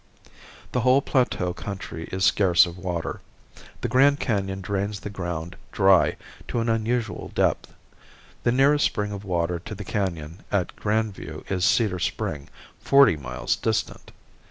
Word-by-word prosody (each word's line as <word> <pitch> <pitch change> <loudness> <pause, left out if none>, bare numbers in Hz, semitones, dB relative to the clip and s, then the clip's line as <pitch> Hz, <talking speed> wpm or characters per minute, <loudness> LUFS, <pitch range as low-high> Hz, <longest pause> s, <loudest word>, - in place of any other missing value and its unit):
The 125 - 0
whole 130 +3 +4
plateau 100 -9 0
country 90 -4 -7
is 95 0 0
scarce 90 -4 +5
of 85 -1 -7
water. 90 -3 -4 0.6
The - - -1
Grand 140 +2 +4
Canon 95 -4 -1
drains 100 +2 -3
the 105 - -6
ground 85 -2 -5 0.2
dry 95 -2 +4 0.3
to 120 - -1
an 115 0 0
unusual 115 -3 -1
depth. - - +1 0.7
The 120 - +2
nearest 140 +4 +4
spring 105 -2 -1
of 100 0 -6
water 85 -2 -1
to 105 - -8
the 100 0 -8
Canon 85 -4 -3
at 95 -4 0
Grand 110 0 0
View - - -9
is 90 -1 +1
Cedar 105 -6 +2
Spring, 75 -3 -3 0.3
forty 140 -9 +5
miles 65 -4 -2
distant. - - -2
100 Hz, 150 wpm, -25 LUFS, 90-115 Hz, 0.7 s, scarce